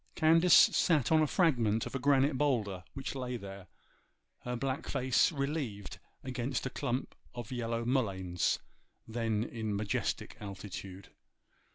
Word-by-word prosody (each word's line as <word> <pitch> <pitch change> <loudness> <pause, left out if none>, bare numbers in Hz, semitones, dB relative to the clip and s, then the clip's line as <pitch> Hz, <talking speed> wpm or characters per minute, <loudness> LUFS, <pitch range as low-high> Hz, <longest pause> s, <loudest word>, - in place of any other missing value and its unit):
Candace 165 +2 +4
sat 150 -7 +5
on 160 -1 +5
a 155 - +3
fragment 120 - +2
of - - -7
a 135 - -2
granite 140 +1 +3
boulder 110 -10 0
which 135 - -4
lay 125 -2 -4
there, 95 -3 -9 0.7
her 125 0 -4
black 130 +2 -3
face 130 +4 +2
relieved 140 - -4 0.2
against 130 0 -3
a 130 - -3
clump 125 +2 -3 0.2
of 120 0 -7
yellow 115 -1 -2
mulleins, 95 -9 0 0.5
then 110 -2 -1
in 110 -3 -3
majestic 100 0 -2
altitude. 100 -1 -8
120 Hz, 135 wpm, -32 LUFS, 105-135 Hz, 0.7 s, sat